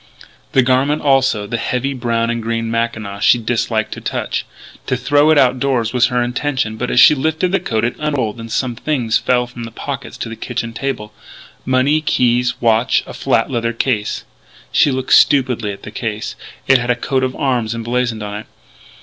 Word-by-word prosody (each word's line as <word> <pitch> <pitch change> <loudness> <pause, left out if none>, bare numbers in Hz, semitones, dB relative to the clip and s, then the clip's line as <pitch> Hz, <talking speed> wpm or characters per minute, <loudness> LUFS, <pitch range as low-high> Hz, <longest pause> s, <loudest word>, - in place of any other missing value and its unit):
The 130 - +5
garment, 135 +4 +1
also 135 -7 +2
the 115 +3 -3
heavy 130 +4 -1
brown 115 -2 -1
and 120 0 -3
green 115 0 -2
mackinaw 110 -3 -2
she 120 - +5
disliked 110 -1 -1
to - - -6
touch. - - -3 0.4
To 130 - 0
throw 145 +4 +3
it 155 - +5
out 130 -2 +4
doors 125 -4 0
was 125 -1 +4
her 125 -1 0
intention; 125 -2 -2
but, 125 +3 -3
as - - +2
she 140 - +8
lifted 160 +5 0
the 195 - +2
coat, 115 -11 -2
it 120 - -2
unrolled 130 -8 -2
and 115 0 -8
some 125 +1 -1
things 120 -3 0
fell 125 -1 +1
from 120 -1 -9
the 115 - -6
pockets 115 - -6
to - - -5
the 115 - -6
kitchen 115 +1 -4
table, 120 -5 -4 0.5
money, 130 +4 +2
keys, 125 -4 +2
a - - -6
watch, 115 +1 +3
a - - -9
flat 115 +3 0
leather 115 -2 -1
case 115 -3 -1 0.5
She 145 - +4
looked 130 -1 -1
stupidly 130 -6 +4
at 100 - -10
the - - -8
case. 110 -2 -4 0.3
It 130 -1 +6
had 120 +1 -4
a 120 - +3
coat 130 +2 -1
of 130 -1 -1
arms 120 -5 -1
emblazoned 115 -1 -2
on 105 0 -5
it. 110 - -10
120 Hz, 200 wpm, -17 LUFS, 115-130 Hz, 0.5 s, she